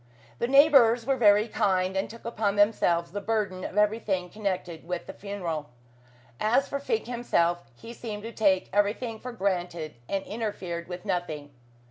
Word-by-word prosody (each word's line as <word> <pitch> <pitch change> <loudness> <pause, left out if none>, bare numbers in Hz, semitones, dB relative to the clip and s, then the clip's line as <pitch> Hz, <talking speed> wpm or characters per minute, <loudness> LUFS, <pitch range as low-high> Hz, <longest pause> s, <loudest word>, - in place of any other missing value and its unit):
The 235 - +1
Neighbours 265 -4 +6
were 270 +1 +2
very 210 -2 +5
kind, 185 -3 +1
and 190 - -1
took 230 0 -12
upon 215 -3 0
themselves 175 -5 +2
the 205 +2 -4
burden 200 -4 -1
of 195 - -5
everything 210 -4 +1
connected 185 -5 -3
with 180 -1 -3
the - - -8
funeral. 175 -7 -4 0.7
As 245 +6 +2
for 280 - -3
Fink 440 +11 -1
himself, 175 -8 0
he 230 - -10
seemed 215 -3 -6
to 230 - -6
take 195 -4 +2
everything 215 +3 0
for 250 - -6
granted, 180 -7 -2 0.2
and 195 -1 -1
interfered 190 -6 -4
with 180 +2 -7
nothing. 155 -7 -3
205 Hz, 160 wpm, -27 LUFS, 180-230 Hz, 0.7 s, Neighbours